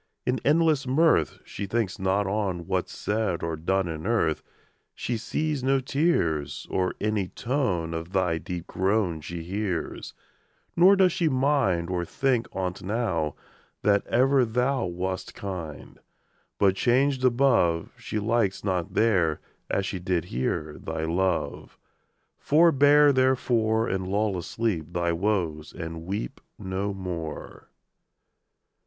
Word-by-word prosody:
In 125 +1 0
endless 155 -2 +3
mirth, 135 - +3
She 100 - -6
thinks 110 -1 -1
not 95 +2 +1
on 95 -4 -2
What's 95 -1 -1
said 105 -5 -2
or 80 -1 -1
done 95 +4 0
In 80 +2 -5
earth: 80 -10 +1 0.5
She 120 - -2
sees 145 +5 -2
no 135 +1 +3
tears, 85 - 0
Or 90 -1 0
any 105 -3 0
tone 100 - -1
Of 80 +2 -5
thy 90 -4 +1
deep 85 +1 -6
groan 95 -4 0
She 85 +2 -6
hears; 95 -1 -4 0.6
Nor 185 +4 +7
does 190 -2 +4
she 170 -2 +1
mind, 130 - +1
Or 90 -1 -1
think 125 +5 0
on't 90 -1 -3
now, 90 -8 -1 0.5
That 100 -1 +3
ever 130 +2 +4
thou 125 +1 0
Wast 90 +1 -4
kind: 90 -7 -7 0.6
But 95 -2 +3
changed 130 +4 +2
above, 120 -10 +3
She - - -4
likes 105 -2 0
not 90 -4 -2
there, 90 -9 +2 0.3
As 100 - 0
she 95 - -3
did 90 -2 -1
here, 75 +5 -3
Thy 80 0 -4
love. 90 +2 -1 0.6
Forbear, 145 -2 +5
therefore, 120 -4 +2
And 95 -1 -2
lull 100 +1 0
asleep 90 -2 -2
Thy 85 -1 0
woes, 85 -5 -1
and 80 0 -7
weep 95 -11 -4 0.2
No 95 +2 -3
more. 90 -5 -6
95 Hz, 130 wpm, -26 LUFS, 85-125 Hz, 0.6 s, Nor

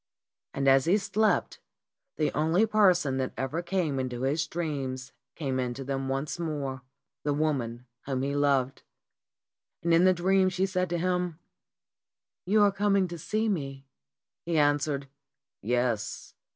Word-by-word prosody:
And 135 0 0
as 135 0 +5
he 185 +5 +4
slept 210 +1 0 0.6
the 155 - +1
only 160 +8 +2
person 180 -10 +3
that 130 -1 -2
ever 140 +6 -2
came 170 -6 -1
into, 125 -1 -3
his 150 +4 0
dreams 135 -6 -4 0.2
came 135 -5 -2
into 125 +1 -3
them 135 0 -3
once 135 +5 -2
more 145 -6 -3 0.4
the 145 -1 0
woman 125 -6 -1 0.2
whom 130 -2 -1
he 140 +1 -1
loved. 140 -2 +1 1.0
And 170 0 +2
in 165 +2 +5
the 185 - +7
dream 190 +2 +3
she 185 +1 0
said 185 -2 -1
to 175 - -1
him, 180 -1 -1 1.1
"You 210 +2 +5
are 205 - +5
coming 200 -1 +2
to 170 -1 -7
see 215 +7 -1
me." 135 -8 -3 0.6
He 170 -1 -1
answered, 145 -1 +1 0.5
"Yes. 120 -1 -1
150 Hz, 145 wpm, -28 LUFS, 135-180 Hz, 1.1 s, the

